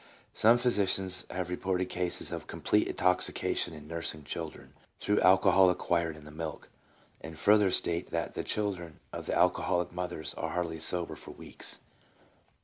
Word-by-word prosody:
Some 115 +2 +5
physicians 95 -6 +1
have 90 -1 -4
reported 90 0 -1
cases 90 -1 -2
of - - -5
complete - - +1
intoxica 90 0 +1
tion - - -1
in 75 -1 -11
nursing 80 -2 -2
children 80 +2 -7 0.2
through 105 0 +1
alcohol 95 0 +6
acquired 85 -2 0
in 75 - -14
the 75 - -11
milk, 80 0 -6 0.5
and 80 -1 -8
further 105 +3 +5
state 85 -1 +1
that 85 -1 -2
the - - -3
children 95 -6 -3
of - - -6
alcoholic 90 0 +2
mothers 90 -3 -3
are - - -4
hardly 85 -2 -2
sober 85 +2 -1
for - - -12
weeks. - - -3
90 Hz, 150 wpm, -30 LUFS, 80-95 Hz, 0.5 s, alcohol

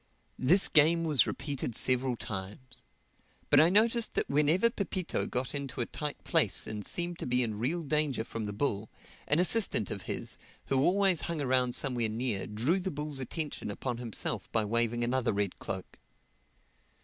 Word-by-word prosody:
This 180 +10 +4
game 165 +2 +4
was 150 -6 +4
repeated 140 -6 -3
several 130 0 +2
times. 110 +5 -7 0.7
But - - +7
I 160 - +6
noticed 225 +4 +2
that - - 0
whenever 155 +10 +3
Pepito 190 -4 -2
got 125 +1 -2
into 140 -4 -5
a 120 - 0
tight 150 +3 -6
place - - +2
and 105 -1 -5
seemed 175 - -2
to - - -4
be 125 0 +2
in 110 -3 -3
real 160 +9 -1
danger 150 -5 0
from 115 -1 -5
the 105 - -4
bull, 105 -1 -2 0.4
an 150 - +3
assistant 180 - +3
of - - -4
his, - - -3 0.3
who 135 - +1
always 190 +2 +3
hung 170 -2 -3
around 130 -3 +1
somewhere 120 -5 0
near, 110 -2 -1
drew 120 - 0
the 190 +1 -3
bull's 150 -3 -4
attention 150 -1 -4
upon 120 +3 -4
himself 115 -4 -3
by 110 -2 +1
waving 115 +2 0
another 125 -1 0
red 100 -2 -2
cloak. 95 -2 -7
130 Hz, 170 wpm, -30 LUFS, 115-160 Hz, 0.7 s, But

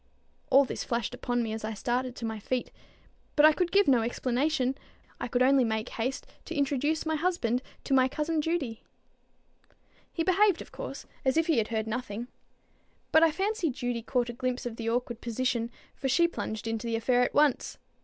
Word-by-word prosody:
All 275 +1 +6
this - - -4
flashed 235 -1 -2
upon 245 -1 -1
me 220 -1 -3
as 220 - -5
I 220 0 -3
started 245 +4 -1
to 230 - -5
my 220 -1 -3
feet: 250 +4 -2 0.6
but 300 - +7
I 310 - +8
could 350 +2 0
give 400 0 +4
no 255 -4 +5
explanation; 255 +3 0 0.4
I - - -3
could 250 -1 +2
only 265 0 +5
make 220 0 -1
haste 255 +4 -3 0.2
to 335 - -6
introduce 290 +3 0
my 315 - 0
husband 305 -8 0 0.2
to - - -1
my 260 -1 +5
cousin 305 +3 -1
Judy. 295 -9 -2 1.3
He 330 - -1
behaved, 380 0 +4
of - - -20
course, - - -7 0.2
as 265 +1 +2
if 325 - +3
he 320 -7 +3
had 215 - 0
heard 220 -1 -1
nothing. 235 0 -4 0.8
But 315 - +6
I 330 - +6
fancy 385 0 0
Judy 245 -2 -3
caught 245 +1 0
a - - -4
glimpse 255 +1 -2
of 240 -2 -4
the 230 -1 -2
awkward 240 0 -2
position, 235 0 -1 0.2
for 270 - -3
she 340 +6 +4
plunged 220 -10 -5
into 225 +1 -2
the 230 - 0
affair 245 +2 +2
at 250 - 0
once. 295 -3 +2
255 Hz, 195 wpm, -29 LUFS, 235-300 Hz, 1.3 s, I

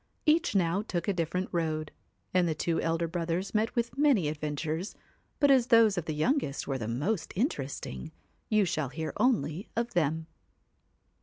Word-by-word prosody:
Each 310 -7 +3
now 180 +1 +2
took 175 -6 -3
a 200 - +2
different 180 +2 -1
road, 155 -3 -1 0.4
and 180 -1 +3
the 160 - 0
two 165 +2 0
elder 165 +1 0
brothers 170 +2 -2
met 220 +1 +1
with 235 +2 -1
many 260 - +4
adventures; 155 +4 -3 0.4
but 285 -1 +5
as 255 -3 +5
those 230 -4 +6
of 175 -4 -2
the 155 - -3
youngest 155 - 0
were 135 -2 -1
the 110 - -4
most 155 - -1
interesting, 140 - -3 0.4
you 215 -2 +4
shall 155 -5 -1
hear 155 +3 -4
only 190 - +1
of 235 +1 -1
them. 160 -1 +1
170 Hz, 165 wpm, -29 LUFS, 155-220 Hz, 0.4 s, those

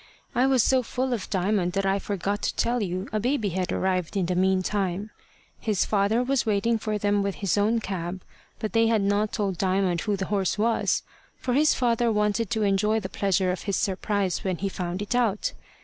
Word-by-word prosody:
I 250 +2 +3
was 260 -4 +4
so 260 -1 +3
full 255 +2 -2
of 220 -6 -4
Diamond 190 -1 0
that 195 0 0
I 195 +1 +2
forgot 200 +1 -2
to - - -1
tell 240 0 +1
you 185 0 -3
a 215 - +1
baby 235 -2 0
had 185 0 -2
arrived 185 0 -1
in 190 - +1
the 180 - -1
meantime. 190 +2 0 0.5
His 210 -4 0
father 210 +3 +2
was 265 0 +1
waiting 220 +1 +1
for 215 -1 -2
them 205 0 +1
with 200 -1 -1
his 195 -5 0
own 215 +3 +2
cab, 185 -2 -4 0.3
but 215 - -4
they 225 0 +4
had 225 -3 +2
not 205 +1 +1
told 195 -5 -2
Diamond 185 -2 +1
who 210 - 0
the 190 - -2
horse 195 -1 +1
was; 225 +2 +1 0.3
for 250 - -2
his 300 +4 +4
father 235 -2 +2
wanted 210 0 +1
to 220 -2 0
enjoy 210 +2 +2
the 190 -3 -6
pleasure 190 -1 +1
of 180 - -4
his 195 - +1
surprise 195 -1 -1
when 185 -2 -1
he 195 +3 -2
found 180 +1 -4
it 205 - -3
out. 230 -5 +1
205 Hz, 210 wpm, -26 LUFS, 190-225 Hz, 0.5 s, was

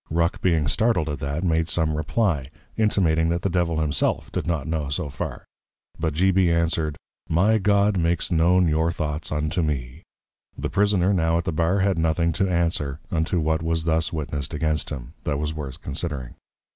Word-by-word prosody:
_ - - -70
Ruck 85 +2 0
being 80 -5 +2
startled 95 - +1
at 75 -1 -4
that, 70 +4 -3
made 80 -2 +1
some 80 -2 +1
Reply, 75 - 0 0.3
intimating, 85 -7 +2
that 85 0 -1
the 100 - 0
Devil 85 -2 +1
himself 75 -2 0
did - - -3
not 80 -6 -1
know 80 -2 -2
so 75 +2 -2
far; - - -5 0.5
but 80 -2 -1
G. 95 +4 +3
B. 95 -1 +3
answered, 85 -2 0 0.3
My 100 +7 +3
God 100 0 +3
makes 85 +1 0
known 85 +2 +4
your 80 +1 +2
Thoughts 75 -2 -3
unto 75 +4 -1
me. 70 -6 -3 0.6
The - - -3
Prisoner 100 -2 +2
now 80 -2 +2
at 85 - -1
the 90 - -2
Bar 85 +5 +1
had 95 -3 +1
nothing 80 +1 +1
to 95 +4 0
answer, 80 -5 0
unto 85 +1 0
what 80 0 0
was 80 0 -1
thus 80 0 +1
witnessed 75 -3 -4
against 75 +1 0
him, 65 -5 -7
that 75 -2 -1
was 75 +1 -2
worth 70 -4 -7
considering. 70 -4 -3
80 Hz, 185 wpm, -24 LUFS, 75-85 Hz, 0.6 s, known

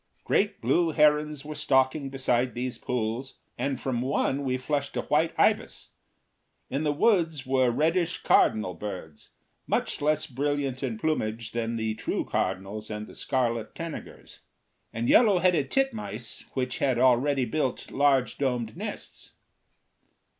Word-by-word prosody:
Great 205 0 +1
blue 170 -1 +2
herons 150 -1 +2
were 155 - -5
stalking 135 0 +1
beside 130 -2 0
these 125 -1 -3
pools, 125 +2 -3 0.2
and 140 -2 -2
from 125 -3 -2
one 135 +1 0
we 130 -1 0
flushed 140 +1 -2
a - - +1
white 155 +2 +2
ibis. - - +1 0.8
In 140 +4 -1
the 150 - +2
woods 165 -4 +2
were 130 -1 +3
reddish 165 +7 0
cardinal 110 -5 +3
birds, 90 -5 -8 0.4
much - - -1
less 155 +1 +1
brilliant 140 -1 -2
in 125 -5 -2
plumage 115 -6 -2
than 115 0 -2
the 110 -1 -1
true - - -2
cardinals 95 +3 -2
and 105 0 -4
the - - -13
scarlet 120 -5 -1
tanagers; 165 -1 -8 0.5
and 115 +1 -2
yellow 215 -6 +6
headed 175 -6 +2
titmice 220 - -2
which 125 -1 -2
had 130 -3 +2
already 130 +2 +3
built 130 +2 -2
large 135 -3 +2
domed 125 -5 -1
nests. - - -7
130 Hz, 140 wpm, -27 LUFS, 120-150 Hz, 0.8 s, yellow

